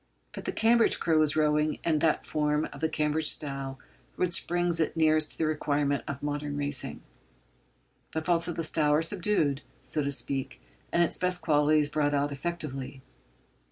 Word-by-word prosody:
But - - -8
the - - -1
Cambridge 230 +1 +3
crew 160 -2 +2
is 155 -1 +1
rowing 150 0 +1
in 155 -2 +1
that 160 0 +1
form 150 0 0
of - - -11
the 160 - +1
Cambridge 155 0 +1
style 135 -2 +2 0.4
which 180 -1 +1
brings 175 -1 0
it 160 +1 -1
nearest 155 -1 +2
to - - -14
the 160 - 0
requirements 145 -3 0
of 140 0 -6
modern 145 0 -3
racing. 145 -2 -3 1.1
The 160 - -2
faults 170 0 +1
of 175 - -3
the 165 - -2
style 155 -1 +1
are 155 - +2
subdued, 165 -6 +1 0.2
so 155 - -1
to 140 0 -1
speak, 135 -1 -3 0.3
and 170 - +3
its 170 - 0
best 180 -1 -1
qualities 150 -1 +3
brought 145 0 0
out 145 +1 0
effectively. 140 -4 -5
155 Hz, 175 wpm, -28 LUFS, 145-165 Hz, 1.1 s, Cambridge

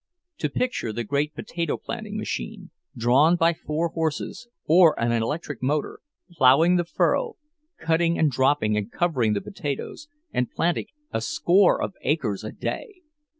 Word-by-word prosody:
To - - -1
picture 250 - -2
the 120 +2 -3
great 145 +6 -1
potato 170 -3 -3
planting - - -6
machine, - - -5 0.3
drawn 130 +8 +4
by 170 0 +3
four 160 +1 -2
horses, 160 +8 -3 0.2
or 165 0 +5
an 115 0 +1
electric 130 +4 -2
motor, 145 +3 -1 0.3
ploughing 165 +3 +5
the 175 - 0
furrow, 465 - 0 0.4
cutting 165 +1 +1
and 155 -3 +3
dropping 130 -4 +2
and 105 +2 -2
covering 130 -11 +1
the 100 - -1
potatoes, 190 - -5 0.3
and 125 - 0
planting 170 +1 -1 0.2
a - - -1
score 175 - +3
of - - -3
acres 125 -9 -1
a 110 - -5
day! 415 -6 -5
150 Hz, 150 wpm, -25 LUFS, 125-170 Hz, 0.4 s, or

